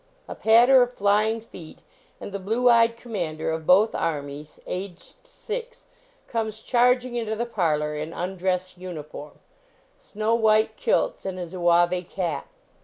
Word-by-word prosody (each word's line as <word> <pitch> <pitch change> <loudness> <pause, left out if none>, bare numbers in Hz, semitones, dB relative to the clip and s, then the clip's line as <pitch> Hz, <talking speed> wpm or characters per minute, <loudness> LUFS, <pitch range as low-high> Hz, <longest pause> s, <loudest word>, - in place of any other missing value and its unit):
A - - -6
patter 240 +4 +5
of 245 0 +1
flying 215 +2 +1
feet, 175 -7 -13 0.4
and - - -8
the 200 - -4
blue 225 +6 0
eyed 230 -1 +5
commander 175 -10 -4
of 160 -1 -5
both 205 +5 +5
armies, 145 -1 -4
aged 185 -1 -7
six, 480 0 -7 0.4
comes 220 -1 -3
charging 250 0 +2
into 225 -2 -2
the 235 +2 -2
parlor 155 -9 -1
in 155 +2 -5
undress 185 +1 -2
uniform 155 -4 -8 0.6
snow 215 +2 -2
white 220 -1 +3
kilt* - - 0
and 190 -1 -4
a 180 - -4
zouave 175 +1 +1
cap. 170 -7 -3
200 Hz, 140 wpm, -24 LUFS, 175-230 Hz, 0.6 s, patter